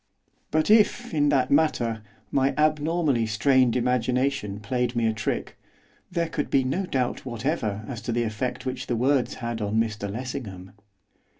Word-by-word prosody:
But 155 +6 +2
if, 230 +2 +3
in 145 -2 +3
that 130 -3 +2
matter, 120 -7 +2 0.3
my 135 0 +2
abnormally 155 -5 +2
strained 125 +3 +3
imagination 125 -3 0
played 125 +3 -1
me 115 -1 +1
a 110 - +2
trick, 110 -1 -3 0.5
there 170 -2 0
could 160 -2 -3
be 135 - +3
no 175 +9 -1
doubt 130 -7 -1
whatever 115 -4 -2
as 120 -4 -6
to - - -3
the 120 +1 +1
effect 115 +4 -3
which 130 0 -4
the 120 - 0
words 130 +2 +1
had 115 -2 -4
on 105 +1 -1
Mr 110 -2 0
Lessingham. 110 -6 -6
125 Hz, 160 wpm, -25 LUFS, 115-145 Hz, 0.5 s, if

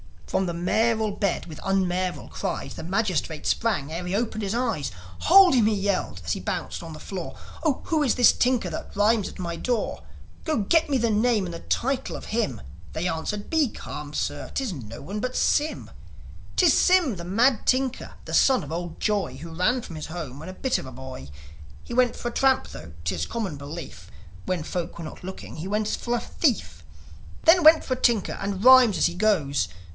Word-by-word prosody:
From 190 - 0
the 170 - -2
mayoral 220 +5 +1
bed 200 -2 -1
with 155 -3 -10
unmayoral 185 -1 -1
cries - - -4
The - - -8
magistrate 180 -4 -1
sprang 190 -11 0
ere 175 +2 -4
he'd 185 - -1
opened 220 0 -1
his 200 +2 -1
eyes. 235 - -1 0.3
"Hold 375 0 +7
him!" 240 -5 +4
he 215 0 +2
yelled, 195 - -1
as 80 - -2
he - - -1
bounced - - -4
on 165 -2 -8
the 155 - -10
floor. 185 -4 -6 0.3
"Oh, 305 -5 +1
who 315 -2 0
is 275 -5 +2
this 245 - +7
tinker 245 -7 +1
that 160 - -7
rhymes 210 0 +3
at - - -10
my 170 -2 -4
door? 240 +4 -2 0.4
Go 310 -6 +1
get 315 +10 +2
me 275 - +2
the 235 -2 +1
name 215 -1 +2
and 175 - -6
the 165 - -6
title 265 +8 -1
of - - -8
him 215 - -1
1" - - -13 0.3
They 165 +3 -1
answered. 205 +6 -3
"Be 320 -3 +3
calm, 150 -8 -8
sir. - - -3
'Tis 265 -5 -1
no 115 -6 -8
one 195 +9 -5
but 255 +3 -3
Sym. 300 +2 0 0.6
'Tis 350 -5 +5
Sym, 350 - +4
the 170 - -7
mad 230 +7 +2
tinker, 260 0 0
the - - -8
son 265 - +4
of 145 - -8
old 170 0 -5
Joi, 200 - 0
Who 165 +5 -9
ran 215 +10 +1
from 165 -7 -9
his 155 - -6
home 155 -5 -6
when 160 +4 -8
a - - -7
bit 260 +6 0
of - - -8
a - - -8
boy. 130 - -9 0.5
He - - -8
went 250 0 +3
for 240 - -4
a - - -10
tramp, 265 -1 +2
tho' - - -10
'tis - - -1
common 205 -10 -3
belief, 140 - -8 0.4
When 180 -4 -1
folk 175 +1 -4
were 170 - -6
not 155 - -9
looking 190 -3 -8
he 165 +4 -5
went 210 +1 0
for 240 0 -1
a - - 0
thief; 270 -9 -1 0.6
Then 345 +2 +6
went 315 +1 +8
for 255 - -1
a - - -12
tinker, 230 -5 +2
and 195 0 -3
rhymes 255 -4 +8
as - - +4
he - - -4
goes. 160 - +1
200 Hz, 210 wpm, -25 LUFS, 170-245 Hz, 0.6 s, went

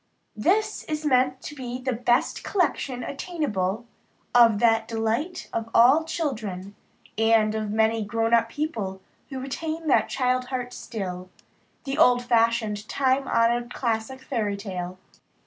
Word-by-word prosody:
This 380 - +1
is 305 0 -4
meant 260 -1 +2
to 295 - -7
be 250 -3 -5
the 260 0 -2
best 240 +1 +1
collection 285 -9 -1
attainable 240 - -2 0.5
of 235 -3 +6
that 225 0 +3
delight 230 +10 -2
of 230 0 -3
all 270 +7 +6
children, 215 - -4 0.5
and 225 -1 +4
of 215 -1 -2
many 220 +1 +2
grown 225 +2 -1
people 230 -8 -4 0.3
who 265 -2 -5
retain 315 +5 -4
the 295 - +4
child 255 -1 0
heart 250 -1 -4
still 185 -5 -6 0.5
the 275 +1 -3
old 245 -5 +5
fashioned, 230 -3 +1
time 270 0 +1
honored 240 +1 +1
classic 235 +2 -2
Fairy 210 -7 -2
tale. 185 -3 -5
240 Hz, 130 wpm, -25 LUFS, 220-270 Hz, 0.5 s, of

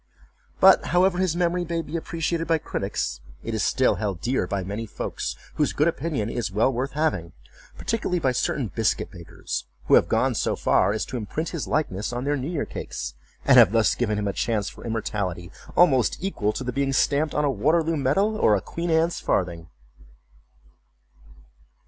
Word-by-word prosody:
But - - +7
however 180 +2 +2
his 185 -3 +1
memory 175 0 +1
may 170 -1 -2
be 155 - -7
appreciated 165 0 -2
by 165 - +3
critics, 65 - -3 0.2
it - - -4
is - - -1
still - - +2
held 100 -5 -2
dear 120 - 0
by 100 0 -2
many 105 +4 -5
folks, - - -4 0.2
whose 150 - +1
good 150 - +2
opinion 155 -9 -1
is 115 -3 -3
well 110 +7 +2
worth 130 +3 -2
having; 145 - -1 0.4
particularly 215 -5 -1
by 135 -6 +1
certain 125 -1 -1
biscuit 110 -5 0
bakers, 85 -4 -6 0.2
who - - +1
have - - +6
gone - - +2
so - - 0
far - - +2
as 110 - -2
to 125 - -5
imprint 150 +9 -3
his 165 -5 -4
likeness 110 -10 -1
on 120 +1 -3
their 145 +1 +1
new 135 +2 -3
year 165 -5 -2
cakes; 65 +1 -6 0.3
and - - +7
have - - +7
thus 115 -1 +4
given 110 -4 -1
him 105 -1 -1
a 100 - -1
chance 105 -2 -1
for - - -13
immortality, 100 -6 -3 0.3
almost 135 -9 +4
equal 170 - -1
to 130 - -5
the 125 0 -3
being 135 +1 0
stamped 145 +3 +1
on 150 - +2
a 140 - +2
Waterloo 155 +8 +1
Medal, 175 +10 +1
or 110 - +4
a - - +1
Queen 170 +1 -4
Anne's 165 +1 +2
Farthing. 85 -3 -1
135 Hz, 185 wpm, -24 LUFS, 105-165 Hz, 0.4 s, But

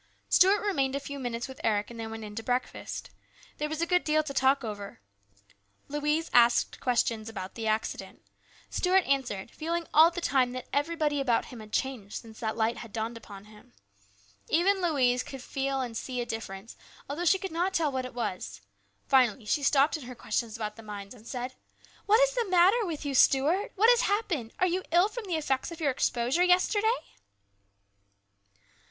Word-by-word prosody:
Stuart 390 +4 +5
remained 275 -9 +1
a - - 0
few 280 0 -7
minutes 240 -1 -3
with 265 - -10
Eric 210 0 0
and 235 - -10
then 225 -1 -4
went 225 0 -7
in 210 -1 -8
to 225 - -4
breakfast. 250 +2 -3 0.5
There 300 0 -1
was 315 +2 -2
a - - +2
good 360 +1 +2
deal 310 0 +2
to 285 -2 -6
talk 265 0 +3
over. 205 - -6 0.9
Louise 300 +3 0
asked 240 -1 +4
questions 230 -3 0
about 190 -4 -7
the 225 -1 -4
accident. 215 0 -3 0.5
Stuart 370 +1 +3
answered, 245 -7 -1
feeling 335 +2 -3
all 320 +2 +8
the 350 0 -5
time 260 -6 +1
that 255 -1 -6
everybody 295 0 0
about 245 -4 +1
him 245 - -10
had 215 -1 -11
changed 240 -7 -3
since 225 -2 -9
that 220 -1 -3
Light 225 +1 +1
had 230 - -9
dawned 225 +2 -3
upon 205 -3 -11
him. 210 0 -18 0.8
Even 380 +4 +3
Louise 260 -8 +2
could 270 - -8
see 270 +2 -3
and 260 -4 -2
feel 250 +1 -3
a - - -8
difference, 225 -2 -7 0.3
although 295 +5 -3
she 355 +2 +4
could 385 0 -6
not 350 +4 0
tell 330 -6 +1
what 260 -1 -2
it 255 -1 -8
was. 180 - -4 0.5
Finally 250 -4 +3
she 290 - +1
stopped 285 +3 +3
in 285 - -10
her 250 0 -8
questions 230 -1 -2
about 215 -2 -5
the - - -9
mines 205 -1 -8
and 230 -2 -15
said: 250 0 -4 0.5
"What 430 +2 +6
is - - -6
the 475 -5 -1
matter 375 +5 +4
with 310 -3 -5
you, 280 - -2
Stuart? 285 +9 +3
What 445 +4 +6
has 485 0 +4
happened? 385 - -1
Are 370 - +3
you 365 +1 0
ill 350 +5 +4
from 465 0 -7
the 360 -4 -2
effects 270 -4 -1
of 335 - -9
your 295 -4 +2
exposure 250 +5 +1
yesterday 410 +6 +3
270 Hz, 195 wpm, -28 LUFS, 230-335 Hz, 0.9 s, all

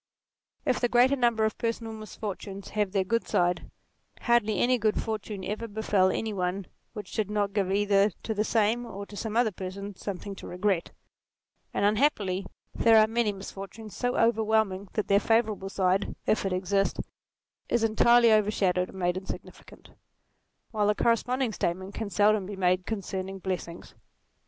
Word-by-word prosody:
If - - +1
the 245 - +1
greater 250 +3 +4
number 235 -4 +2
of 220 - -2
personal 230 -1 -2
misfortunes 205 -2 -7
have 210 -2 -1
their 195 -1 +1
good 230 +5 -1
side, 175 0 0 0.5
hardly 230 -4 +2
any 250 0 +3
good 215 -1 +1
fortune 215 -3 -4
ever 215 +3 -3
befel 205 -3 +2
any 220 +3 -2
one 185 0 -2 0.3
which 210 -4 -8
did 215 -2 -1
not 205 -1 -1
give 195 -3 0
either 200 0 +3
to 220 - -2
the 210 0 0
same 225 +2 +1
or 200 -1 -7
to 205 - -12
some 220 +1 -3
other 235 -2 +3
person, 195 +2 -7
something 200 +1 -6
to - - -9
regret: 180 -1 0 0.8
and - - 0
unhappily 205 -5 +1 0.3
there 225 -1 +5
are 215 - +7
many 225 -1 0
misfortunes 195 +2 -9
so 245 - -1
NATURE - - +1
35 230 - +6
overwhelming 220 -4 0
that 215 - -1
their 200 0 +4
favourable 215 -3 +1
side, 190 0 0
if 210 -2 +1
it - - -3
exist, 195 +2 0 0.7
is 235 - +1
entirely 235 +1 +5
overshadowed 195 -4 +2
and - - -11
made 180 0 0
insignificant; 190 +1 -9 0.8
while 210 -2 +1
the 210 - +3
corresponding 245 +2 +1
statement 185 +2 -2
can 220 -2 -4
seldom 205 0 +3
be 205 - -6
made 185 -1 +1
concerning 195 -2 -4
blessings. 180 -3 -5
205 Hz, 165 wpm, -28 LUFS, 190-220 Hz, 0.8 s, are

